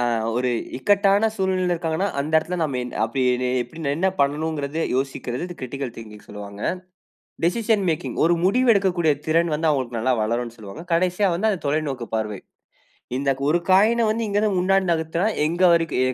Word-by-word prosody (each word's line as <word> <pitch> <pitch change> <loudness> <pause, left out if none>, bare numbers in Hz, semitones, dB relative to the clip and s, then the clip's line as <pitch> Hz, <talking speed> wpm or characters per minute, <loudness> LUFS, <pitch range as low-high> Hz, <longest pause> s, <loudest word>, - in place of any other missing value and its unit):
ஆ. - - 0 0.3
ஒரு 125 0 +1 0.3
இக்கட்டான 200 +5 +3
சூழ்நிலையில 185 -2 0
இருக்காங்கன்னா, 165 +4 -1
அந்த 150 +3 -3
இடத்துல 180 +3 -4
நம்ம 140 -5 -1
என் 125 - -7 0.7
எப்படிடே 140 +3 -4
என்ன 190 +3 +2
பண்ணனுங்கிறது, 150 +1 -1 0.2
யோசிக்கறது 135 +5 -3
கிரிட்டிக்கல் 130 -1 -5
திங்கிங்னு 105 -2 -11
சொல்வாங்க. 100 0 -9 0.8
டிசிஷன் 215 +2 +1
மேக்கிங் 160 +2 -2
ஒரு 170 +1 +4
முடிவு 250 +6 +2
எடுக்கக்கூடிய 180 -5 +2
திறன் 165 +1 +2
வந்து 160 +1 0
அவங்களுக்கு 130 -5 -1
நல்லா 130 +3 +1
வளரும்னு 120 +2 -2
சொல்லுவாங்க. 110 - -9
கடைசியா 180 +3 +2
வந்து 220 +5 +1
அந்த 190 -5 -1
தொலைநோக்கு 140 -5 -2
பார்வை. 105 -3 -3 0.8
இந்த 140 0 0 0.2
ஒரு 175 - +3
காயின்ன 220 +5 +5
வந்து 225 0 -1
இங்க 205 0 0
இருந்து 205 -4 +1
முன்னாடி 195 +1 +2
நகர்த்துனா, 165 +4 -1 0.2
எங்க 175 +3 -1
வரைக்கும் 165 -6 +1
160 Hz, 155 wpm, -23 LUFS, 130-190 Hz, 0.8 s, காயின்ன